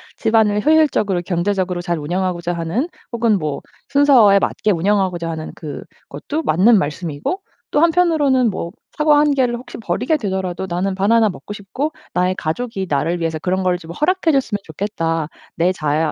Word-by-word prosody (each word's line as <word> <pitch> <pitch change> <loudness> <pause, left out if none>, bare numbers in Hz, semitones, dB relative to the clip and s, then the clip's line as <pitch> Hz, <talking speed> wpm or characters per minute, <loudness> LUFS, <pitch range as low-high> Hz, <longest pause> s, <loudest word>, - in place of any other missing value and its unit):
집안을 210 -2 +2
효율적으로 290 - +3
경제적으로 180 0 -1
잘 175 -1 -2
운영하고자 175 +2 -2
하는 170 - -2 0.2
혹은 230 -3 +2
뭐 150 -4 -3 0.3
순서에 255 -9 +6
맞게 210 - 0
운영하고자 185 -2 0
하는 160 -1 -5
그것도 285 - -7
맞는 205 +8 +4
말씀이고 160 - -3 0.3
또 295 - +2
한편으로는 315 -8 +3
뭐 170 -3 -4 0.3
사과 300 -1 +4
1 295 -1 +3
개를 250 -3 +1
혹시 245 - -10
버리게 225 - -1
되더라도 190 - -3
'나는 185 +2 -1
바나나 220 +4 +3
먹고 205 - -8
싶고 230 +10 -4 0.2
나의 180 +1 +1
가족이 195 +3 -3
나를 155 +5 0
위해서 165 -1 -1
그런 185 +3 -1
걸 180 -1 +2
좀 165 -1 -11
허락해 335 - +1
줬으면 260 -7 0
좋겠다. 165 -3 -2 0.3
내 175 +2 +2
자야 155 -1 0
195 Hz, 370 characters per minute, -19 LUFS, 170-245 Hz, 0.3 s, 순서에